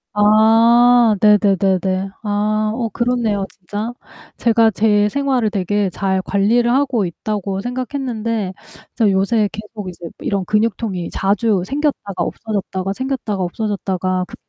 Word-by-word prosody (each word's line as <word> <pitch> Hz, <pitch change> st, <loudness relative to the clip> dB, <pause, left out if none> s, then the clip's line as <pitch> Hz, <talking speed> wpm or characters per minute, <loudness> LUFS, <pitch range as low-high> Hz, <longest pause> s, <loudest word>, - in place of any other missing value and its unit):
아 225 Hz, +2 st, +5 dB
네네네네. 195 Hz, -2 st, +2 dB
아 215 Hz, +1 st, 0 dB
어 230 Hz, -2 st, -2 dB
그렇네요, 235 Hz, -5 st, 0 dB
진짜. 205 Hz, +6 st, -6 dB, 0.4 s
제가 230 Hz, -1 st, +3 dB
제 210 Hz, 0 st, +2 dB
생활을 265 Hz, -4 st, 0 dB
되게 200 Hz, 0 st, -1 dB
잘 190 Hz, +1 st, -1 dB
관리를 230 Hz, +6 st, +2 dB
하고 260 Hz, -6 st, +1 dB
있다고 195 Hz, +2 st, -4 dB
생각했는데 240 Hz, -5 st, -3 dB, 0.4 s
진짜 220 Hz, -4 st, +3 dB
요새 200 Hz, +2 st, +1 dB
계속 210 Hz, -2 st, -8 dB
이제 175 Hz, -1 st, -10 dB
이런 195 Hz, -2 st, -2 dB
근육통이 210 Hz, -3 st, -1 dB
자주 200 Hz, -1 st, +1 dB
생겼다가 280 Hz, -5 st, -2 dB
없어졌다가 195 Hz, -2 st, -3 dB
생겼다가 255 Hz, -5 st, -3 dB
없어졌다가 185 Hz, -1 st, -2 dB
그 -, -, -10 dB
210 Hz, 290 characters per minute, -18 LUFS, 195-230 Hz, 0.4 s, 아